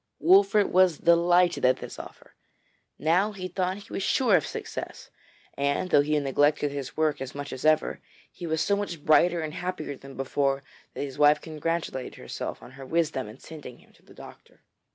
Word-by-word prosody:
Wolfert 195 Hz, +4 st, +5 dB
was 185 Hz, -3 st, +4 dB
delighted 175 Hz, +1 st, +3 dB
at 130 Hz, 0 st, +4 dB
this -, -, -9 dB
offer. -, -, -12 dB, 0.6 s
Now, 180 Hz, +8 st, +2 dB
he 185 Hz, -2 st, -5 dB
thought, 185 Hz, +1 st, -2 dB
he 205 Hz, -, -13 dB
was -, -, -2 dB
sure 225 Hz, +1 st, +3 dB
of 160 Hz, -, +1 dB
success, -, -, -7 dB, 0.4 s
and 140 Hz, +6 st, -1 dB
though 145 Hz, -, +6 dB
he 150 Hz, +1 st, 0 dB
neglected 145 Hz, +1 st, +1 dB
his 140 Hz, -2 st, -6 dB
work 155 Hz, -3 st, +1 dB
as 135 Hz, 0 st, -6 dB
much 145 Hz, 0 st, -6 dB
as 130 Hz, -, -6 dB
ever, 155 Hz, 0 st, +2 dB, 0.3 s
he 175 Hz, -, -8 dB
was 160 Hz, 0 st, 0 dB
so 200 Hz, -, +2 dB
much 175 Hz, -7 st, -5 dB
brighter 170 Hz, +2 st, +4 dB
and 155 Hz, -1 st, -5 dB
happier 180 Hz, -5 st, -4 dB
than 135 Hz, +1 st, -13 dB
before 135 Hz, +1 st, 0 dB, 0.3 s
that -, -, -4 dB
his 140 Hz, -2 st, -7 dB
wife 150 Hz, 0 st, +6 dB
congratulated 160 Hz, -4 st, -4 dB
herself -, -, -6 dB
on -, -, -12 dB
her 135 Hz, +1 st, -11 dB
wisdom 155 Hz, -6 st, 0 dB
in 110 Hz, -, -12 dB
sending 145 Hz, -5 st, -11 dB
him -, -, -23 dB
to -, -, -25 dB
the -, -, -19 dB
doctor. -, -, -14 dB
155 Hz, 190 wpm, -26 LUFS, 140-180 Hz, 0.6 s, though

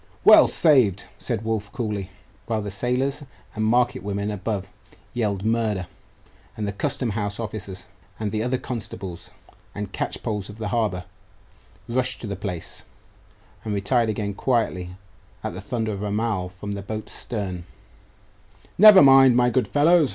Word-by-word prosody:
'Well -, -, +9 dB
saved!' 125 Hz, -, +3 dB
said 110 Hz, -, -3 dB
Wulf 105 Hz, -2 st, -2 dB
coolly, 105 Hz, -5 st, -3 dB, 0.4 s
while 110 Hz, -2 st, -1 dB
the 100 Hz, -, -4 dB
sailors 125 Hz, +8 st, -1 dB, 0.3 s
and 110 Hz, -, -2 dB
market 120 Hz, 0 st, +2 dB
women 100 Hz, +1 st, -2 dB
above 100 Hz, -1 st, -3 dB, 0.5 s
yelled 105 Hz, -4 st, -1 dB
murder, 110 Hz, -4 st, 0 dB, 0.7 s
and 105 Hz, -1 st, -2 dB
the -, -, -1 dB
custom 115 Hz, +4 st, -2 dB
house 105 Hz, 0 st, -3 dB
officers, 105 Hz, -4 st, -5 dB, 0.3 s
and 105 Hz, -1 st, -3 dB
other 120 Hz, +4 st, 0 dB
constables 95 Hz, -8 st, -7 dB, 0.5 s
and 100 Hz, -1 st, -5 dB
catchpolls 105 Hz, -4 st, -3 dB
of 105 Hz, -, -10 dB
the 110 Hz, -2 st, -4 dB
harbour, 105 Hz, -5 st, 0 dB, 0.8 s
rushed 125 Hz, +1 st, 0 dB
to -, -, -5 dB
the 100 Hz, -2 st, -3 dB
place 90 Hz, -4 st, -5 dB, 0.8 s
and 105 Hz, -2 st, -2 dB
retired 115 Hz, +3 st, +1 dB
again 105 Hz, -1 st, -2 dB
quietly 100 Hz, -6 st, 0 dB, 0.5 s
at -, -, -3 dB
the 90 Hz, -, -7 dB
thunder 110 Hz, +1 st, -2 dB
of 100 Hz, -, -4 dB
the 105 Hz, -, -3 dB
Amal 105 Hz, -3 st, -1 dB
from 95 Hz, +3 st, -7 dB
the 100 Hz, -1 st, -4 dB
boat's 110 Hz, +2 st, -6 dB
stern 95 Hz, -6 st, -5 dB, 1.1 s
'Never 210 Hz, -3 st, +10 dB
mind, 135 Hz, -2 st, +7 dB
my 125 Hz, 0 st, +4 dB
good 120 Hz, -2 st, +1 dB
follows! 155 Hz, -, +4 dB
105 Hz, 150 wpm, -24 LUFS, 100-120 Hz, 1.1 s, Never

